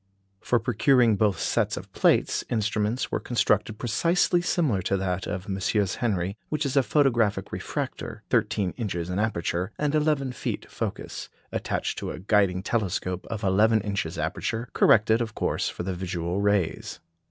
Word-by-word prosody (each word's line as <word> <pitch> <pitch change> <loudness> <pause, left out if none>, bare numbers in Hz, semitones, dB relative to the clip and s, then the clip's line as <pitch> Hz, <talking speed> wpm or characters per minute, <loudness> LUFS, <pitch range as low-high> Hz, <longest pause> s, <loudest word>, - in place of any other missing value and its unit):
For 120 - +1
procuring 120 -1 +3
both 100 -3 +2
sets - - 0
of - - -9
plates, - - +2
instruments 110 +1 0
were - - 0
constructed 110 -3 +1
precisely 170 - +2
similar 155 - +1
to 100 +2 0
that 95 -1 -2
of 95 -3 -3
the 100 - -6
MM. 95 0 0
Henry, 100 -5 -1
which 150 0 -1
is 140 0 -1
a 140 - +6
photographic 115 -6 +1
refractor, - - -5
thirteen 95 -4 +1
inches 90 -7 -3
in 90 - -1
aperture, 90 -4 -1
and 150 -1 0
eleven 150 -3 +1
feet 125 - -4
focus, - - -5 0.2
attached - - -2
to - - -4
a - - -5
guiding 95 0 +2
telescope 90 -4 -2
of 110 -1 -4
eleven 105 +4 +4
inches 100 -5 -3
aperture, 110 +9 -2
corrected, 110 +1 +4
of 110 -2 -3
course, - - 0
for - - -6
the 95 +1 -2
visual 90 +1 -2
rays. 100 -4 0
105 Hz, 160 wpm, -26 LUFS, 95-120 Hz, 0.2 s, a